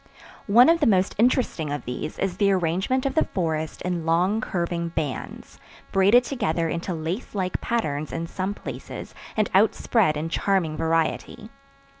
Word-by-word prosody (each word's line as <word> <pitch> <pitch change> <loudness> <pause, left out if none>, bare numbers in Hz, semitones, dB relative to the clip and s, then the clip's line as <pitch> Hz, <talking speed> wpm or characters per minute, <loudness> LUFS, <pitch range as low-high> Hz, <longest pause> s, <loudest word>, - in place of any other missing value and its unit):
One 235 +5 +7
of 330 +1 +4
the 295 - +3
most 190 -3 +3
interesting 230 - +1
of 145 -3 -4
these 125 +5 -5
is 190 -2 -2
the 200 -1 +3
arrangement 190 +9 0
of 275 - 0
the 315 - +2
forest 160 -4 -2
in 175 -2 -2
long 180 +7 +2
curving 170 -3 -2
bands, 155 -5 -5 0.3
braided 200 +6 +5
together 170 - -1
into 170 +2 -3
lace 165 +9 -4
like 185 -2 -2
patterns 155 -11 -2
in 165 0 -3
some 190 +4 -3
places - - -8 0.2
and 215 -2 +2
out 200 +4 +4
spread 190 -11 +2
in 155 +2 -2
charming 170 -2 0
variety. 165 +6 -1
180 Hz, 160 wpm, -24 LUFS, 165-210 Hz, 0.3 s, One